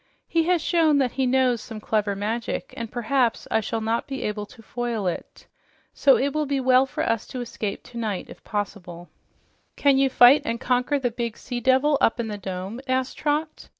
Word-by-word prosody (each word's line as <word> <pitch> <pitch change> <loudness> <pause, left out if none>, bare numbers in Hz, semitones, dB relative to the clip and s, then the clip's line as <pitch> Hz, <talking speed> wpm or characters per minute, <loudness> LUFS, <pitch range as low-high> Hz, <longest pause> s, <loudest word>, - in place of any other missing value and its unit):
He 330 -1 +1
has 350 -2 +2
shown 320 -4 +3
that 260 -3 +2
he 265 -1 0
knows 250 -2 +2
some 220 -1 -8
clever 210 -2 0
magic, 225 +4 -3
and 230 -1 -6
perhaps 245 0 0
I - - +3
shall 225 +1 -3
not 225 +4 -1
be 270 -3 -4
able 210 0 -3
to 225 - -16
foil 235 -3 -3
it. 180 - -5 0.5
So 275 -2 +5
it 280 +2 0
will 305 -1 -1
be 280 0 0
well 260 0 +4
for - - -3
us 230 -1 -1
to 255 - -6
escape 220 -4 -4
tonight 225 -6 -4
if - - -13
possible." 180 -4 -5 0.7
"Can 280 -2 +3
you 270 0 +3
fight 255 +3 +7
and 230 0 -2
conquer 250 +4 +1
the 250 -3 -1
big 235 -1 -4
sea 245 -2 -5
devil 265 +4 +3
up 225 - +3
in 230 -2 -2
the 205 -1 -5
dome?" 190 +5 -5
asked 260 0 0
Trot. 305 +1 -2
245 Hz, 200 wpm, -24 LUFS, 220-270 Hz, 0.7 s, fight